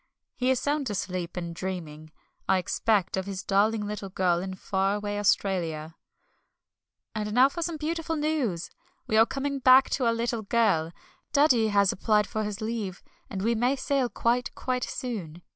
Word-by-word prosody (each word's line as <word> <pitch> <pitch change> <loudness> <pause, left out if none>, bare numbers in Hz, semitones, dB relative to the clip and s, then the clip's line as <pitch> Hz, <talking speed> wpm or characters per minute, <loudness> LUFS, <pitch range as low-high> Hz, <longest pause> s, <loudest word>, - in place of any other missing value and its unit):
He 255 0 0
is 260 -2 +3
sound 290 -3 -1
asleep, 185 -3 -3
and 170 -1 -4
dreaming, 165 -4 -6 0.4
I 190 - +5
expect, 190 +1 0
of 190 +1 -3
his 195 -1 -5
darling 210 +2 +2
little 205 -1 -5
girl 180 -2 +1
in 190 +1 -5
far 195 +1 0
away 205 0 -3
Australia. 165 -6 0 1.2
And 210 -1 -3
now 260 +2 +6
for 340 +4 -6
some 335 -1 -2
beautiful 325 +1 -2
news! 295 - -1 0.3
We 220 - -1
are 225 +1 +6
coming 275 0 -2
back 260 +1 +6
to 255 -3 +1
our 230 - +3
little 230 0 -1
girl. 200 -7 +1 0.4
Daddy 260 -6 +4
has 200 -2 +3
applied 210 +1 +2
for 215 +2 -3
his 210 +1 -4
leave, 215 -4 -4 0.3
and 195 -1 -4
we 230 +2 +2
may 245 +4 +1
sail 270 -2 0
quite, 240 +2 0
quite 250 -1 -2
soon. 180 -10 -5
210 Hz, 170 wpm, -27 LUFS, 190-250 Hz, 1.2 s, now